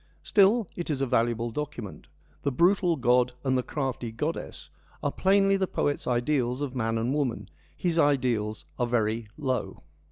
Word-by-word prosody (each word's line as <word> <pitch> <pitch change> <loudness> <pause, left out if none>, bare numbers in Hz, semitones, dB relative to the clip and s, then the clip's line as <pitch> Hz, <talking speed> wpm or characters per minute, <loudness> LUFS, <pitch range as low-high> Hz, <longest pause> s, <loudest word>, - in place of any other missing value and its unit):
Still, 205 +1 +4
it 175 - -4
is 145 -3 -1
a - - +2
valuable 120 -2 +1
document. 140 -7 -6 0.3
The 140 - 0
brutal 175 +4 +3
god 125 -2 +3
and 130 -1 +1
the 130 - +2
crafty 130 -4 -3
goddess 150 +9 -5 0.3
are - - +1
plainly 195 +1 +3
the 190 -1 0
poet's 145 -4 -1
ideals 125 +1 0
of 135 -2 -4
man 115 -2 0
and 115 +4 0
woman; 140 -5 0
and - - -12 0.3
his 170 -2 0
ideals 125 -8 +1
are 120 - +1
very 115 -1 0
low. 130 - -3
130 Hz, 165 wpm, -27 LUFS, 120-155 Hz, 0.3 s, Still